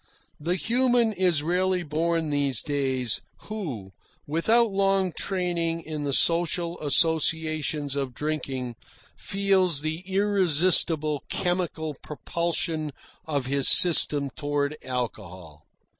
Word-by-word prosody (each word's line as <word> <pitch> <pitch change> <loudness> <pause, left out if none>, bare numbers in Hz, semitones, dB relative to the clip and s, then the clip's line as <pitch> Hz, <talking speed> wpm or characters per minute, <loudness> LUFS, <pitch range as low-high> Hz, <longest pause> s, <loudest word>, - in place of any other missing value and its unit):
The 170 +4 -1
human 240 +2 +2
is 180 -6 +1
rarely 180 +2 +1
born 160 0 -1
these 140 -4 0
days, 130 -5 -1 0.3
who, 140 - -5 0.3
without 220 +9 +2
long 195 -1 +1
training 170 -3 -1
in 155 -2 -5
the 140 - -1
social 170 +3 0
associations 155 -1 0
of 135 -3 -3
drinking, 135 -5 -4 0.4
feels 190 -6 +1
the 155 +1 -3
irresistible 175 -6 +2
chemical 175 -4 -2
propulsion 160 -1 -3 0.3
of 145 -4 -1
his 135 +1 +3
system 145 -5 +5
toward 145 0 -2
alcohol. 95 - -6
160 Hz, 100 wpm, -26 LUFS, 145-180 Hz, 0.4 s, system